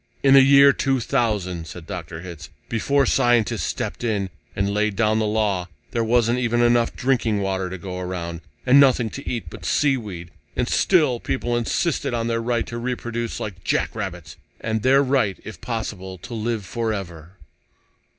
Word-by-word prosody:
"In 135 -1 +6
the 135 - +9
year 140 +1 +7
2000," 110 -10 0
said 80 +1 -9
Dr. 85 -3 -7
Hitz, 85 -4 -9 0.2
"before 140 +5 +1
scientists 120 -3 +2
stepped - - -3
in 100 -5 -1 0.2
and 100 0 0
laid 105 0 0
down 110 +1 +2
the 110 - +1
law, 105 -4 0 0.2
there 115 - 0
wasn't 120 +1 +2
even 120 -1 +1
enough 120 0 +3
drinking 120 -5 +1
water 95 -1 -1
to 95 - -5
go 90 0 -6
around, 85 -2 -5 0.2
and 135 +2 +7
nothing 125 -5 +4
to 140 - -6
eat 120 - -4
but - - -10
sea 140 -3 +2
weed 90 -7 -8 0.2
and - - 0
still 150 -10 +3
people 120 -1 -2
insisted 120 +3 0
on 115 -1 -1
their 115 0 0
right 115 0 0
to 120 - -6
reproduce 120 -1 -3
like 95 -4 -6
jackrabbits. 90 -8 -3 0.2
And 110 -1 -2
their 135 +4 +4
right, 130 -8 +1
if 110 - -9
possible, 95 -5 -5
to 105 - -10
live 110 -2 -2
forever." 95 -7 -4
110 Hz, 170 wpm, -23 LUFS, 95-120 Hz, 0.2 s, the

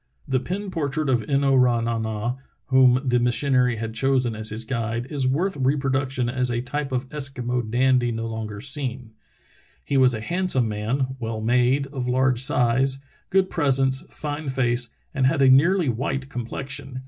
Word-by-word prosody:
* - - -35
The 130 -1 +1
pen 190 +8 -5
portrait 150 -3 -2
of 125 -3 +2
In 140 0 +2
no 135 -1 +3
ra 125 -2 +4
na 115 0 -1
na, 110 +3 -3 0.3
whom 130 -1 +5
the 125 -1 +3
mis 120 0 +1
sionary 125 -4 +2
had 110 0 -4
chosen 130 -1 +1
as 110 0 -2
his 110 +1 -5
guide, 115 -1 -2
is 140 -3 0
worth 175 +9 0
reproduction 135 -1 0
as 125 +1 +1
a 120 -1 -1
type 140 +3 -4
of 130 0 -2
Eskimo 125 -5 -2
dandy 125 0 +2
no 115 0 -3
longer 110 -2 -5
seen. 130 -4 -3 0.7
"He 140 - 0
was 130 -2 +4
a - - -4
handsome 170 -2 0
man, 125 +5 -2
well 115 -2 -4
made, 125 +4 +2
of 130 -3 -3
large 130 -1 +2
size, 130 +2 +1 0.2
good 190 0 +2
pres 145 -6 +2
ence, 135 0 +2
fine 150 -1 -4
face, 120 -2 0 0.2
and 135 -3 +2
had 135 - +1
a 135 - +6
nearly 170 +5 +4
white 135 +3 -2
complexion. 130 +2 -5
130 Hz, 185 wpm, -23 LUFS, 120-135 Hz, 0.7 s, a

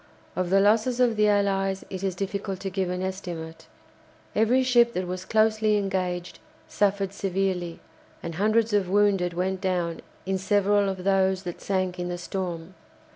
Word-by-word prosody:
Of 185 -1 -1
the 195 +1 +4
losses 225 +5 +3
of 245 -3 +3
the 210 0 +3
Allies 195 -2 +1
it 190 -2 -5
is 190 -2 -1
difficult 195 0 -3
to 195 - -4
give 190 -1 -1
an 180 +1 -2
estimate. 175 -4 -6 0.7
Every 240 +4 +3
ship 240 -2 +4
that 185 +1 -2
was 185 +1 -5
closely 215 -1 +3
engaged 185 -3 -2 0.3
suffered 200 -1 0
severely, 185 -3 -2 0.4
and 170 - -4
hundreds 215 +5 +2
of 200 -3 +2
wounded 195 -3 +2
went 190 +1 -1
down 180 -3 -1 0.2
in 190 0 -1
several 205 +1 +2
of 190 -1 -5
those 190 -1 +2
that 175 -2 -6
sank 185 -2 -1
in 175 - -2
the 175 - -3
storm. 175 -1 -5
195 Hz, 165 wpm, -26 LUFS, 180-205 Hz, 0.7 s, the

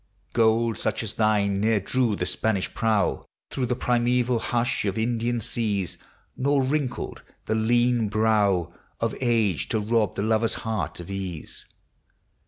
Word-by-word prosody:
Gold 115 0 +2
such - - -1
as 105 - -3
thine 105 -2 +2
ne'er 110 0 +3
drew 115 +2 +1
the - - -2
Spanish 110 -4 -1
prow 110 -4 +1 0.3
Through 130 -2 -1
the 125 - 0
primeval 125 0 +1
hush 120 +3 0
of 100 +1 -1
Indian 120 +1 0
seas; 100 -5 -1 0.4
Nor 140 +1 +2
wrinkled 135 -1 -2 0.2
the 110 - 0
lean 120 0 +2
brow 100 -5 +2 0.3
Of 115 -1 -1
age 110 - +1
to 110 - +1
rob 110 -1 +1
the 100 - -1
lover's 110 +1 +2
heart 110 -4 -2
of 85 +2 -8
ease. 95 -5 -6
110 Hz, 145 wpm, -25 LUFS, 105-120 Hz, 0.4 s, ne'er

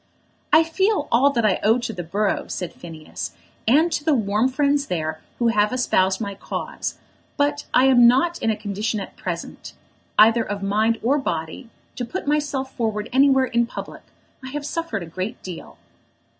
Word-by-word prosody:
"I 320 - +7
feel 380 0 0
all 255 +5 +5
that 235 -5 0
I 205 - +2
owe 220 +3 +4
to 235 -2 -4
the 180 - -5
borough," 200 +5 -1
said 180 -2 -5
Phineas, 160 -2 -8 0.3
"and 310 +8 +4
to 295 - -1
the 310 -1 +3
warm 215 +2 +1
friends 280 +1 +1
there 155 -2 -3 0.2
who 235 -1 +2
have 210 -2 +2
espoused 190 -7 +1
my 200 -3 -3
cause; 195 - -5 0.4
but 290 0 0
I 255 - +5
am 245 -3 +7
not 300 +8 +2
in - - +1
a 220 - +2
condition 210 +1 -3
at 195 - -8
present, - - -6 0.4
either 225 +2 +6
of 205 -2 -4
mind 215 +3 +1
or 275 +5 +2
body, 165 - -4 0.3
to 250 - -2
put 240 - -5
myself 285 -2 -1
forward 220 -2 -2
anywhere 265 0 +5
in 235 -1 +1
public. - - -8 0.4
I - - -7
have 295 -1 -4
suffered 295 - -3
a - - -6
great 185 +8 -5
deal." 180 -3 -9
235 Hz, 180 wpm, -22 LUFS, 205-280 Hz, 0.4 s, I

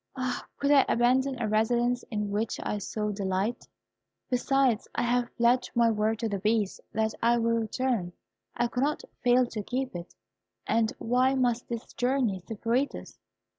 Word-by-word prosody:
Ah! 255 -2 -3
could 280 +1 +1
I 280 -2 +7
abandon 255 +3 +2
a 225 - -1
residence 240 +3 +1
in 210 -2 -2
which 210 +2 -1
I 210 - -2
so 210 +1 -3
delight! 195 +3 -2 0.6
Besides, 255 -2 +2
I - - 0
have 240 0 +1
pledged 240 +2 +3
my 235 -1 +4
word 215 +1 0
to 230 - 0
the 200 -2 -2
Beast, 210 0 0
that 220 0 0
I 235 +1 +4
will 230 0 +1
return. 225 -4 -1 0.5
I 240 - +2
cannot 275 +5 -1 0.2
fail 250 +1 +5
to 225 -3 -5
keep 255 +2 -3
it; 175 0 -8 0.5
and 225 -1 +2
why 255 +3 +2
must 245 -2 0
this 235 0 -6
journey 245 -6 0
separate 230 +5 0
us? - - -10
235 Hz, 165 wpm, -28 LUFS, 215-250 Hz, 0.6 s, I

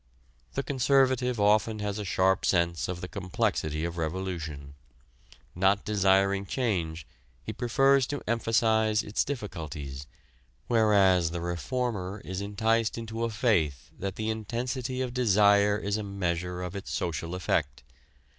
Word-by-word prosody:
The - - -1
conservative 130 -3 +2
often 105 +2 +3
has 105 0 -3
a - - -3
sharp 95 0 +2
sense 85 -2 +1
of 90 -1 -5
the 90 - -5
complexity 85 -4 -1
of 85 0 -5
revolution: 80 -4 -4 0.8
not 95 +3 +2
desiring 100 -1 +2
change, 85 - -2 0.4
he 110 - -5
prefers 135 +3 +3
to 145 - -4
emphasize 110 -1 +2
its 105 - 0
difficulties, 75 - -6 0.6
whereas 100 -7 +4
the 85 +1 -4
reformer 100 +2 -3
is 95 +1 -4
enticed 110 +3 0
into 115 0 -4
a - - -1
faith 100 - 0
that 100 0 -3
the 110 0 -1
intensity 120 +4 -3
of 125 -2 -4
desire 105 -3 +4
is 100 0 -2
a 110 - -3
measure 90 -2 -3
of 90 +2 -6
its 100 - -6
social 85 +1 -3
effect. 90 -8 -1
100 Hz, 135 wpm, -28 LUFS, 90-115 Hz, 0.8 s, whereas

